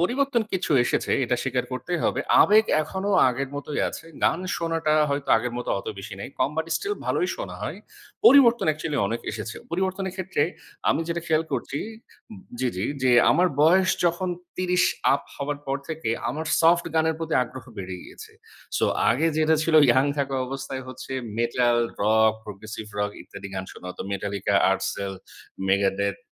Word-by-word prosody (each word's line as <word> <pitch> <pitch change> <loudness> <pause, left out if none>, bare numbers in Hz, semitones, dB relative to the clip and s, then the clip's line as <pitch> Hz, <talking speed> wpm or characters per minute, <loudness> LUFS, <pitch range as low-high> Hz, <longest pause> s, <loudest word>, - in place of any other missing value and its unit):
পরিবর্তন 245 +5 +1
কিছু 190 -2 -2
এসেছে - - 0
এটা 125 +1 0
স্বীকার 130 -1 -1
করতেই 130 +8 -3
হবে। - - +1 0.2
আবেগ 215 +2 +5 0.2
এখনো 190 +6 -3 0.2
আগের 135 +2 -2
মতোই 145 +1 -3
আছে। - - -8 0.2
গান - - +2 0.2
শোনাটা 165 -2 0 0.2
হয়তো 140 0 -2
আগের 120 +2 -2
মত 125 - -5
অত - - -10
বেশি 95 0 -7
নেই। - - -5
কম 130 - +2
বাট 160 - -1
স্টিল 410 +1 -2
ভালোই 365 - +1
শোনা - - -6
হয়। - - -4 0.5
পরিবর্তন 250 - +7
অ্যাকচুয়ালি 155 -1 -1
অনেক 115 +2 -3
এসেছে। 110 0 -6
পরিবর্তনের 190 +1 -2
ক্ষেত্রে 185 -6 -1 0.5
আমি - - +2
যেটা 170 0 -1
খেয়াল 160 -1 +2
করছি 140 - -2 0.8
জি, 130 - 0
জি 95 - -1 0.2
যে 130 - +4 0.2
আমার 180 +1 +4
বয়স 185 +4 +5
যখন 175 +2 +1 0.3
৩০ 180 0 +2 0.3
আপ - - -2
হওয়ার 145 +1 -3
পর 135 0 0
থেকে 160 -6 -4 0.2
আমার 155 +6 -3
সফট 170 +1 +4
গানের 160 0 +2
প্রতি 165 -1 -2
আগ্রহ 125 +1 -8
বেড়ে 95 -1 -5
গিয়েছে। - - -12 0.4
সো - - +2 0.3
আগে 135 +8 +2
যেটা 160 0 +3
ছিল 160 0 0
ইয়ং 130 +3 +4
থাকা 135 -1 -1
অবস্থায় 135 0 -5
হচ্ছে 130 +1 -8 0.3
মেটাল, 120 0 +2 0.3
রক, 110 +1 +4
প্রগ্রেসিভ 110 +1 -8
রক 105 0 0
ইত্যাদি 100 - -9
গান 95 0 -3
শোনা - - -11
হতো। - - -7
Metallica, 100 0 -2 0.2
আরসেল, 95 +1 -2 0.6
Megadeth, 100 0 +1
140 Hz, 165 wpm, -25 LUFS, 115-170 Hz, 0.8 s, পরিবর্তন